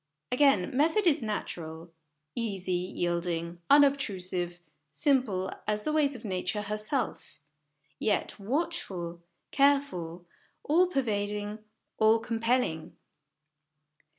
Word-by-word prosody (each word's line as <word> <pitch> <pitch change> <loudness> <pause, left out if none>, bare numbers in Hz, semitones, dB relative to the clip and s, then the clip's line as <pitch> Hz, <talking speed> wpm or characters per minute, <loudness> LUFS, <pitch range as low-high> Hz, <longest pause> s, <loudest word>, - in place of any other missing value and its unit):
Again, 255 -6 +3
method 325 +9 +3
is 315 -6 +4
natural; 170 -6 -5 0.4
easy, 200 -6 -3
yielding, 175 -1 -2
unobtrusive, 190 -12 +3 0.3
simple 220 - +1 0.2
as 210 0 0
the 305 - -1
ways 290 -3 +2
of 235 -1 -9
Nature 190 +1 -2
herself; 210 +6 -3 0.6
yet, 210 0 0
watchful, 195 - -3 0.3
careful, 275 - +1 0.4
all 345 +5 +4
pervading, 210 - -1 0.4
all 220 +1 +6
compelling. 230 -7 -1
210 Hz, 90 wpm, -29 LUFS, 180-275 Hz, 0.6 s, all